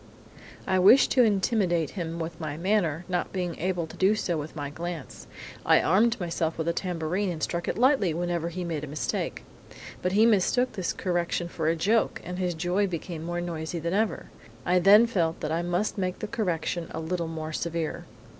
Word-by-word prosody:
"I 185 Hz, -1 st, +2 dB
wished 205 Hz, +9 st, +6 dB
to 255 Hz, -, +5 dB
intimidate 195 Hz, -, +1 dB
him 170 Hz, -3 st, -4 dB
with 165 Hz, 0 st, -5 dB
my 150 Hz, -2 st, -4 dB
manner, 175 Hz, -3 st, 0 dB
not 180 Hz, -1 st, -2 dB
being 180 Hz, -3 st, -2 dB
able 180 Hz, -1 st, -1 dB
to 160 Hz, -, -12 dB
do 195 Hz, +3 st, +3 dB
so 180 Hz, -4 st, -1 dB
with 155 Hz, +1 st, -5 dB
my 145 Hz, -2 st, -4 dB
glance. 170 Hz, +1 st, -7 dB, 0.4 s
I -, -, +5 dB
armed 225 Hz, +7 st, +3 dB
myself 165 Hz, -2 st, -2 dB
with 160 Hz, 0 st, -2 dB
a 170 Hz, -, +2 dB
tambourine 180 Hz, +2 st, -2 dB
and 160 Hz, -4 st, -4 dB
struck 170 Hz, 0 st, -2 dB
it -, -, -1 dB
lightly 250 Hz, -, +3 dB
whenever 170 Hz, 0 st, -2 dB
he 180 Hz, +1 st, -5 dB
made 165 Hz, -4 st, -3 dB
a -, -, -4 dB
mistake. 140 Hz, -3 st, -3 dB, 0.6 s
But 180 Hz, +1 st, -1 dB
he 215 Hz, +3 st, +5 dB
mistook 230 Hz, +4 st, +3 dB
this 190 Hz, -5 st, -2 dB
correction 175 Hz, -1 st, -1 dB
for 160 Hz, -2 st, -3 dB
a 165 Hz, -, +3 dB
joke, 215 Hz, +7 st, +1 dB
and 180 Hz, +1 st, -6 dB
his 180 Hz, -2 st, -1 dB
joy 180 Hz, +5 st, +1 dB
became 170 Hz, -2 st, -5 dB
more 175 Hz, +1 st, -3 dB
noisy 170 Hz, -1 st, -4 dB
than 170 Hz, +2 st, -2 dB
ever. 215 Hz, +2 st, -1 dB, 0.3 s
I 180 Hz, +1 st, +3 dB
then 205 Hz, +5 st, +7 dB
felt 170 Hz, -8 st, 0 dB
that -, -, -2 dB
I 165 Hz, +1 st, 0 dB
must 175 Hz, +4 st, -1 dB
make 185 Hz, -1 st, -1 dB
the -, -, -4 dB
correction 175 Hz, -5 st, -2 dB
a -, -, -5 dB
little 170 Hz, +1 st, -2 dB
more 160 Hz, -1 st, -5 dB
severe. 165 Hz, -1 st, -3 dB
175 Hz, 200 wpm, -27 LUFS, 165-190 Hz, 0.6 s, then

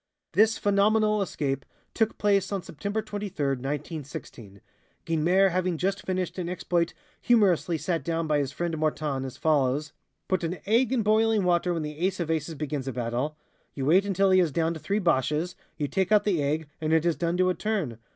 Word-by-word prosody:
This 220 Hz, +2 st, +4 dB
phenomenal 210 Hz, +1 st, +3 dB
escape 140 Hz, -8 st, -2 dB, 0.3 s
took 225 Hz, -1 st, 0 dB
place 200 Hz, -2 st, +2 dB
on 195 Hz, -3 st, -2 dB
September 200 Hz, +10 st, -4 dB
23, 200 Hz, -9 st, -3 dB
1916, 135 Hz, -, -5 dB, 0.5 s
Guynemer 175 Hz, +4 st, +3 dB
having 180 Hz, -1 st, 0 dB
just 195 Hz, +4 st, -1 dB
finished 185 Hz, -1 st, -2 dB
an 175 Hz, -1 st, -3 dB
exploit 175 Hz, -1 st, -1 dB, 0.3 s
humorously 190 Hz, -8 st, +3 dB
set 165 Hz, +3 st, -2 dB
down 165 Hz, -1 st, -1 dB
by 150 Hz, -1 st, +1 dB
his 140 Hz, -2 st, -1 dB
friend 170 Hz, +2 st, -2 dB
Mortane 150 Hz, -3 st, -1 dB
as 130 Hz, 0 st, -7 dB
follows: 150 Hz, 0 st, +1 dB, 0.3 s
"Put 185 Hz, -1 st, 0 dB
an 170 Hz, +2 st, -2 dB
egg 230 Hz, +4 st, +3 dB
in 250 Hz, -4 st, +1 dB
boiling 215 Hz, 0 st, +3 dB
water 180 Hz, 0 st, +2 dB
when 165 Hz, -2 st, -1 dB
the 150 Hz, 0 st, -6 dB
Ace 185 Hz, +2 st, 0 dB
of 165 Hz, -2 st, -1 dB
Aces 160 Hz, 0 st, -2 dB
begins 145 Hz, -2 st, -4 dB
a 135 Hz, -, -2 dB
battle; 125 Hz, +5 st, -2 dB, 0.4 s
you 135 Hz, -, -3 dB
wait 180 Hz, +7 st, +5 dB
until 195 Hz, -1 st, +2 dB
he 185 Hz, -, +6 dB
has 170 Hz, -4 st, +2 dB
downed 165 Hz, +1 st, -1 dB
three 200 Hz, -, -1 dB
Boches, 165 Hz, -1 st, +1 dB, 0.2 s
you 150 Hz, -2 st, -1 dB
take 190 Hz, +8 st, -1 dB
out 210 Hz, -1 st, +5 dB
the 190 Hz, -7 st, +1 dB
egg, 150 Hz, +2 st, -1 dB
and 155 Hz, 0 st, 0 dB
it 160 Hz, 0 st, +3 dB
is 170 Hz, -2 st, +2 dB
done 170 Hz, 0 st, -1 dB
to 185 Hz, 0 st, +3 dB
a -, -, 0 dB
turn. 185 Hz, -, -2 dB
170 Hz, 190 wpm, -27 LUFS, 150-195 Hz, 0.5 s, he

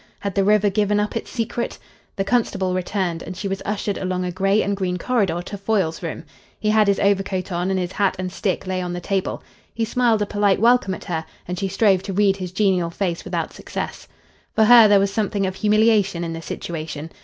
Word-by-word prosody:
Had 200 Hz, -1 st, -3 dB
the 195 Hz, -, +2 dB
river 210 Hz, 0 st, +3 dB
given 205 Hz, 0 st, +1 dB
up 210 Hz, 0 st, -2 dB
its -, -, -4 dB
secret? 235 Hz, 0 st, -3 dB, 0.4 s
The 195 Hz, -, 0 dB
constable 195 Hz, -4 st, 0 dB
returned, 180 Hz, -2 st, -2 dB
and 180 Hz, +2 st, -7 dB
she 200 Hz, -, -3 dB
was 195 Hz, 0 st, -3 dB
ushered 205 Hz, -1 st, -2 dB
along 185 Hz, -1 st, -2 dB
a 180 Hz, -, -2 dB
grey 195 Hz, +3 st, +2 dB
and 200 Hz, -, -1 dB
green 185 Hz, -2 st, -2 dB
corridor 195 Hz, -5 st, 0 dB
to 200 Hz, +2 st, -7 dB
Foyle's 195 Hz, -5 st, 0 dB
room. 165 Hz, -2 st, -5 dB, 0.4 s
He 215 Hz, -, +1 dB
had 215 Hz, -1 st, +4 dB
his 200 Hz, -1 st, +2 dB
overcoat 195 Hz, -2 st, 0 dB
on, 175 Hz, +1 st, -1 dB
and 190 Hz, -1 st, 0 dB
his 180 Hz, 0 st, -3 dB
hat 200 Hz, -1 st, +1 dB
and 185 Hz, 0 st, -4 dB
stick 190 Hz, 0 st, -2 dB
lay 185 Hz, 0 st, -2 dB
on 180 Hz, -1 st, -3 dB
the 175 Hz, -, -3 dB
table. 195 Hz, +1 st, -2 dB, 0.3 s
He 225 Hz, -1 st, 0 dB
smiled 230 Hz, -2 st, +2 dB
a -, -, -1 dB
polite 205 Hz, -1 st, +1 dB
welcome 230 Hz, -4 st, +3 dB
at -, -, -11 dB
her, 160 Hz, -4 st, -2 dB, 0.2 s
and 180 Hz, 0 st, -4 dB
she 195 Hz, -, -1 dB
strove 195 Hz, -1 st, +3 dB
to 195 Hz, 0 st, -5 dB
read 195 Hz, 0 st, +3 dB
his 185 Hz, -2 st, -5 dB
genial 185 Hz, -3 st, +1 dB
face 170 Hz, -1 st, -2 dB
without -, -, -3 dB
success. -, -, -6 dB, 0.5 s
For 220 Hz, -, +5 dB
her 230 Hz, 0 st, +8 dB
there 205 Hz, -1 st, +5 dB
was 195 Hz, 0 st, 0 dB
something 205 Hz, -2 st, 0 dB
of 190 Hz, -, -2 dB
humiliation 210 Hz, -4 st, +3 dB
in 165 Hz, -1 st, -3 dB
the 165 Hz, -, -6 dB
situation. 160 Hz, -2 st, -6 dB
195 Hz, 225 wpm, -22 LUFS, 180-210 Hz, 0.5 s, her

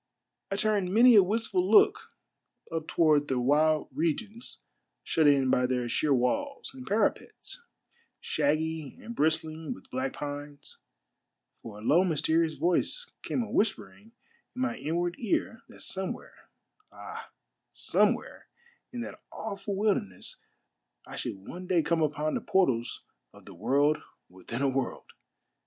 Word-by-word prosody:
I 195 Hz, -, -1 dB
turned 205 Hz, -3 st, +1 dB
many 240 Hz, +4 st, +7 dB
a 210 Hz, -, +9 dB
wistful 230 Hz, -, 0 dB
look 425 Hz, +2 st, +5 dB, 0.6 s
up 160 Hz, -1 st, -3 dB
toward 150 Hz, -3 st, +3 dB
the 130 Hz, -2 st, 0 dB
wild 150 Hz, +4 st, +3 dB
regions 170 Hz, -, -3 dB, 0.5 s
shut 160 Hz, -2 st, +2 dB
in 135 Hz, -3 st, +4 dB
by 125 Hz, 0 st, +3 dB
their 125 Hz, -1 st, -1 dB
sheer 150 Hz, +5 st, 0 dB
walls 275 Hz, -, 0 dB
and 260 Hz, -1 st, -10 dB
parapets, 220 Hz, -, -1 dB, 0.6 s
shaggy 155 Hz, -1 st, -1 dB
and 235 Hz, -, -8 dB
bristling 160 Hz, -1 st, 0 dB
with 95 Hz, -, -17 dB
black 130 Hz, +1 st, -2 dB
pines, 145 Hz, 0 st, -7 dB, 0.8 s
for 105 Hz, -3 st, -9 dB
a 105 Hz, -, -10 dB
low, 165 Hz, +10 st, +5 dB
mysterious 160 Hz, -1 st, +1 dB
voice 335 Hz, -, 0 dB
came 245 Hz, -, -1 dB
a -, -, -8 dB
whispering 220 Hz, +1 st, -2 dB, 0.4 s
in 255 Hz, -, -4 dB
my 260 Hz, -3 st, -1 dB
inward 175 Hz, -1 st, -2 dB
ear 225 Hz, 0 st, -1 dB
that -, -, -14 dB
somewhere, 190 Hz, 0 st, -5 dB, 0.4 s
ah, -, -, -9 dB, 0.4 s
somewhere -, -, 0 dB, 0.4 s
in 245 Hz, -, -5 dB
that -, -, -7 dB
awful 200 Hz, -2 st, -5 dB
wilder 205 Hz, 0 st, +2 dB
ness, 95 Hz, -2 st, -9 dB, 0.7 s
I -, -, -9 dB
should -, -, -3 dB
one 180 Hz, +1 st, -7 dB
day 175 Hz, -3 st, +3 dB
come 170 Hz, 0 st, +1 dB
upon 150 Hz, 0 st, 0 dB
the -, -, -1 dB
portals 130 Hz, -12 st, +1 dB, 0.3 s
of -, -, -16 dB
the -, -, -11 dB
World 145 Hz, +3 st, +2 dB, 0.3 s
with 95 Hz, +4 st, -15 dB
in 120 Hz, +4 st, -1 dB
a -, -, +4 dB
World! 135 Hz, -1 st, -3 dB
160 Hz, 145 wpm, -29 LUFS, 145-210 Hz, 0.8 s, a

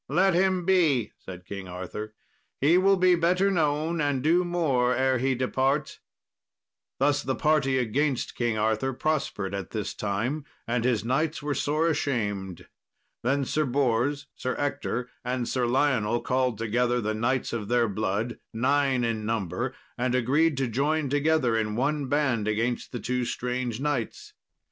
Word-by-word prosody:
"Let 185 Hz, +6 st, +3 dB
him 185 Hz, 0 st, +2 dB
be," 160 Hz, -, +3 dB
said 90 Hz, -1 st, -10 dB
King 100 Hz, -1 st, -7 dB
Arthur; 95 Hz, +4 st, -6 dB, 0.4 s
"he 150 Hz, +5 st, +4 dB
will 195 Hz, +2 st, +4 dB
be 185 Hz, 0 st, +5 dB
better 180 Hz, +3 st, +2 dB
known, 160 Hz, -1 st, 0 dB
and 145 Hz, -3 st, 0 dB
do 170 Hz, +4 st, +4 dB
more 140 Hz, -8 st, +1 dB
ere 130 Hz, 0 st, +2 dB
he 130 Hz, +1 st, +1 dB
depart." 135 Hz, +3 st, 0 dB, 1.0 s
Thus 145 Hz, +1 st, +2 dB
the 130 Hz, -1 st, -2 dB
party 150 Hz, -4 st, +2 dB
against 130 Hz, +3 st, 0 dB
King 120 Hz, -2 st, -1 dB
Arthur 110 Hz, +5 st, 0 dB
prospered 125 Hz, -9 st, -2 dB
at 100 Hz, -1 st, -4 dB
this 110 Hz, -2 st, -3 dB
time, 115 Hz, +9 st, -2 dB, 0.2 s
and 120 Hz, 0 st, -1 dB
his 120 Hz, -3 st, +1 dB
knights 150 Hz, +5 st, 0 dB
were 145 Hz, 0 st, -1 dB
sore 155 Hz, +4 st, +1 dB
ashamed. 105 Hz, -, -2 dB, 0.5 s
Then 135 Hz, +3 st, +1 dB
Sir 155 Hz, +4 st, 0 dB
Bors, 135 Hz, +1 st, +1 dB
Sir 130 Hz, -, -3 dB
Ector, 125 Hz, -3 st, -2 dB, 0.2 s
and 125 Hz, -1 st, -2 dB
Sir 125 Hz, -2 st, 0 dB
Lionel 120 Hz, -3 st, +1 dB
called 125 Hz, -1 st, 0 dB
together 120 Hz, +3 st, +1 dB
the 110 Hz, -1 st, -1 dB
knights 120 Hz, +4 st, -1 dB
of 110 Hz, -3 st, -3 dB
their 120 Hz, 0 st, +2 dB
blood, 105 Hz, +3 st, -2 dB
nine 135 Hz, +1 st, +1 dB
in 115 Hz, -2 st, -1 dB
number, 115 Hz, +3 st, -2 dB, 0.2 s
and 125 Hz, 0 st, +1 dB
agreed 140 Hz, +5 st, +2 dB
to 135 Hz, -1 st, 0 dB
join 140 Hz, +5 st, 0 dB
together 145 Hz, -4 st, +2 dB
in 105 Hz, -1 st, -1 dB
one 140 Hz, +3 st, 0 dB
band 130 Hz, -6 st, +1 dB
against 115 Hz, +3 st, -1 dB
the 120 Hz, -, -4 dB
two 125 Hz, +1 st, -1 dB
strange 125 Hz, -1 st, -3 dB
knights. 135 Hz, -6 st, -3 dB
130 Hz, 155 wpm, -27 LUFS, 115-145 Hz, 1.0 s, be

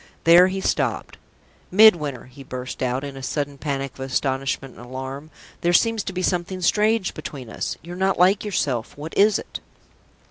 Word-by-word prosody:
There 175 Hz, +2 st, +7 dB
he 190 Hz, +1 st, -3 dB
stopped. -, -, -1 dB, 0.5 s
"Midwinter!" 170 Hz, -, +5 dB
he 135 Hz, +2 st, -13 dB
burst 125 Hz, -1 st, -7 dB
out, 130 Hz, +1 st, -1 dB
in 140 Hz, -1 st, -6 dB
a 135 Hz, -, -8 dB
sudden 145 Hz, +1 st, -3 dB
panic 140 Hz, -3 st, -3 dB
of -, -, -20 dB
astonishment 135 Hz, 0 st, -2 dB
and 120 Hz, -, -12 dB
alarm, 130 Hz, +4 st, -7 dB, 0.3 s
"there 175 Hz, 0 st, +2 dB
seems 225 Hz, +4 st, +3 dB
to -, -, -3 dB
be 185 Hz, 0 st, -3 dB
something 180 Hz, +1 st, -1 dB
strange 210 Hz, +2 st, +2 dB
between 130 Hz, -6 st, -8 dB
us! -, -, -4 dB
You're 175 Hz, +2 st, -8 dB
not 190 Hz, +1 st, +1 dB
like 185 Hz, +3 st, +4 dB
yourself. 145 Hz, -, -2 dB
What 155 Hz, +3 st, -7 dB
is 210 Hz, +1 st, +5 dB
it?" -, -, -7 dB
150 Hz, 175 wpm, -23 LUFS, 135-185 Hz, 0.5 s, There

